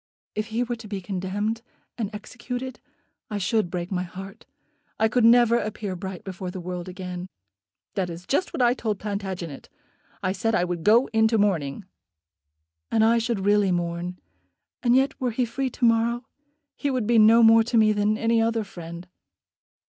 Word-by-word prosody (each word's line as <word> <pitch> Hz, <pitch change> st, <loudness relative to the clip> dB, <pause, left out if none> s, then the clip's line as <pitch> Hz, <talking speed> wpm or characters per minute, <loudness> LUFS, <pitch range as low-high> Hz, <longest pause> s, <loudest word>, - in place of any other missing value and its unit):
"If 215 Hz, 0 st, -3 dB
he 225 Hz, +2 st, -1 dB
were 240 Hz, 0 st, -3 dB
to 225 Hz, -1 st, -10 dB
be 200 Hz, -1 st, -4 dB
condemned, 200 Hz, +4 st, -3 dB, 0.3 s
and 220 Hz, -5 st, -3 dB
executed, 250 Hz, +4 st, -6 dB, 0.5 s
I 210 Hz, -, -3 dB
should 205 Hz, 0 st, +1 dB
break 175 Hz, +1 st, -4 dB
my 180 Hz, -2 st, 0 dB
heart. 190 Hz, +2 st, -9 dB, 0.5 s
I 220 Hz, -, +4 dB
could 245 Hz, +2 st, +1 dB
never 235 Hz, 0 st, +6 dB
appear 210 Hz, -3 st, -4 dB
bright 190 Hz, 0 st, -6 dB
before 185 Hz, -1 st, -6 dB
the 185 Hz, -, -6 dB
world 180 Hz, 0 st, -5 dB
again." 180 Hz, -1 st, -6 dB, 0.7 s
"That 185 Hz, -3 st, -1 dB
is 170 Hz, +1 st, -8 dB
just 325 Hz, +7 st, 0 dB
what 255 Hz, -, 0 dB
I 240 Hz, 0 st, +5 dB
told 220 Hz, -5 st, -2 dB
Plantagenet. 190 Hz, -7 st, -5 dB, 0.5 s
I 185 Hz, -, +1 dB
said 220 Hz, +3 st, 0 dB
I 175 Hz, -, +2 dB
would 175 Hz, -2 st, -3 dB
go 230 Hz, +5 st, +5 dB
into 220 Hz, 0 st, +3 dB
mourning." 190 Hz, -4 st, 0 dB, 1.0 s
"And 220 Hz, 0 st, +3 dB
I 230 Hz, +1 st, +4 dB
should 225 Hz, -4 st, -2 dB
really 205 Hz, -2 st, +4 dB
mourn. 175 Hz, +1 st, -2 dB, 0.6 s
And 240 Hz, 0 st, +3 dB
yet 270 Hz, +2 st, +1 dB
were 255 Hz, -, +1 dB
he 240 Hz, +2 st, 0 dB
free 260 Hz, +3 st, -2 dB
to 250 Hz, -, -1 dB
morrow 235 Hz, +1 st, +2 dB, 0.5 s
he 285 Hz, -, -2 dB
would 255 Hz, -5 st, 0 dB
be 230 Hz, +1 st, +4 dB
no 225 Hz, +2 st, +7 dB
more 225 Hz, 0 st, +7 dB
to 235 Hz, +1 st, 0 dB
me 215 Hz, -1 st, +5 dB
than 210 Hz, +1 st, +1 dB
any 230 Hz, 0 st, +2 dB
other 225 Hz, 0 st, +1 dB
friend." 170 Hz, -2 st, -9 dB
215 Hz, 180 wpm, -25 LUFS, 185-230 Hz, 1.0 s, no